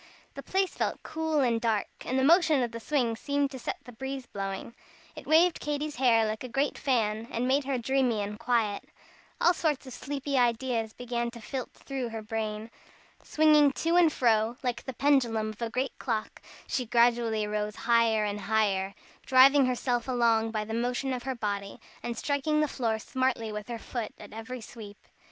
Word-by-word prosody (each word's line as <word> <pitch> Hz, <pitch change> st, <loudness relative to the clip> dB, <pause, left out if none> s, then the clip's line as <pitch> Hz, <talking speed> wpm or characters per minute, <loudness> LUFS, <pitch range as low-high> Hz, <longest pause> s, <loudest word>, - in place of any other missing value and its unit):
The 275 Hz, -, -7 dB
place 380 Hz, +5 st, 0 dB
felt -, -, -2 dB
cool 315 Hz, -2 st, -1 dB
and 235 Hz, -3 st, +1 dB
dark, 220 Hz, -3 st, +1 dB, 0.2 s
and 260 Hz, -, -1 dB
the 265 Hz, -, +2 dB
motion 315 Hz, -3 st, +5 dB
of 240 Hz, -, -2 dB
the 230 Hz, -, -6 dB
swing 240 Hz, -2 st, 0 dB
seemed 285 Hz, +3 st, -1 dB
to 260 Hz, -, -7 dB
set -, -, -4 dB
the 245 Hz, -, -11 dB
breeze 265 Hz, +2 st, -5 dB
blowing. 195 Hz, +2 st, -5 dB, 0.4 s
It -, -, -10 dB
waved 330 Hz, +3 st, +4 dB
Katy's 295 Hz, 0 st, -3 dB
hair 235 Hz, -4 st, +4 dB
like 215 Hz, +2 st, -3 dB
a 255 Hz, -, -6 dB
great 275 Hz, +4 st, 0 dB
fan, 225 Hz, -4 st, 0 dB
and 240 Hz, +2 st, -1 dB
made 270 Hz, +1 st, +2 dB
her 270 Hz, -1 st, 0 dB
dreamy 245 Hz, -3 st, +1 dB
and 210 Hz, +1 st, -6 dB
quiet. 230 Hz, -4 st, 0 dB, 0.6 s
All 350 Hz, -, +5 dB
sorts 305 Hz, -6 st, -1 dB
of 260 Hz, -, -9 dB
sleepy 275 Hz, +1 st, -2 dB
ideas 235 Hz, -2 st, +1 dB
began 240 Hz, -1 st, -3 dB
to 235 Hz, 0 st, -11 dB
flit 255 Hz, +3 st, -5 dB
through 265 Hz, -3 st, -5 dB
her 225 Hz, -1 st, -6 dB
brain. 215 Hz, 0 st, -4 dB, 0.5 s
Swinging 300 Hz, -2 st, +4 dB
to 330 Hz, +4 st, 0 dB
and 345 Hz, -3 st, +6 dB
fro 230 Hz, -3 st, +2 dB
like 245 Hz, -2 st, -2 dB
the 260 Hz, -, -6 dB
pendulum 235 Hz, -6 st, +2 dB
of 215 Hz, -, -14 dB
a 230 Hz, -, -1 dB
great 255 Hz, +3 st, -2 dB
clock, 225 Hz, -4 st, -3 dB, 0.2 s
she 250 Hz, -3 st, -2 dB
gradually 235 Hz, -2 st, +2 dB
rose 210 Hz, 0 st, -2 dB
higher 230 Hz, -2 st, +2 dB
and 205 Hz, 0 st, -3 dB
higher, 200 Hz, -2 st, 0 dB, 0.3 s
driving 265 Hz, +1 st, +6 dB
herself 245 Hz, -1 st, -1 dB
along 230 Hz, -3 st, +2 dB
by 215 Hz, -1 st, -2 dB
the 220 Hz, -, -6 dB
motion 245 Hz, +3 st, -1 dB
of 250 Hz, -, -3 dB
her 260 Hz, +1 st, -3 dB
body, 200 Hz, -3 st, -4 dB, 0.2 s
and 235 Hz, -1 st, -4 dB
striking 295 Hz, +1 st, 0 dB
the 305 Hz, -, +2 dB
floor 230 Hz, -5 st, -1 dB
smartly 245 Hz, -1 st, -1 dB
with 210 Hz, 0 st, -6 dB
her 240 Hz, -1 st, -4 dB
foot, 230 Hz, 0 st, -5 dB
at -, -, -12 dB
every 225 Hz, +3 st, -7 dB
sweep. 210 Hz, -2 st, -10 dB
240 Hz, 190 wpm, -28 LUFS, 220-270 Hz, 0.6 s, and